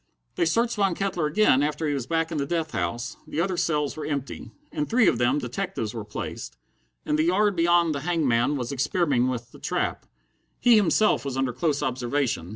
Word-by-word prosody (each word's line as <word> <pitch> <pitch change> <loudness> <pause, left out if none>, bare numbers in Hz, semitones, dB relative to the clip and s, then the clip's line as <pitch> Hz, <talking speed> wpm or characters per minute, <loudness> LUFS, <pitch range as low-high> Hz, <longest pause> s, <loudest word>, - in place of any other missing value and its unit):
They - - +1
searched 230 +7 +1
Von 195 -4 +2
Kettler 185 -5 -1
again 150 -5 +3
after 150 +2 -1
he 145 - 0
was 135 -4 -3
back 165 0 0
in 155 - -2
the 140 - 0
death 165 -2 -2
house. 120 +1 -3
The 155 - -4
other 185 +2 0
cells 150 -4 0
were 155 - -6
empty. 140 -3 -4 0.2
In 300 -1 -2
three 235 -3 +3
of - - +2
them 125 +3 +2
detectives 125 - -3
were 115 -2 -5
placed. 105 -10 -7 0.5
In 150 - +1
the 155 - +2
yard 200 +3 +2
beyond 170 -1 +3
the 140 - -3
hangman 145 -5 +1
was 125 -1 -4
experimenting 140 -2 +1
with 120 -1 -5
the - - -14
trap. - - -2 0.5
He 240 -2 +6
himself 215 +1 +3
was 135 -2 -4
under 135 -2 0
close 140 +3 0
observation. 125 - -1
150 Hz, 200 wpm, -25 LUFS, 130-175 Hz, 0.5 s, He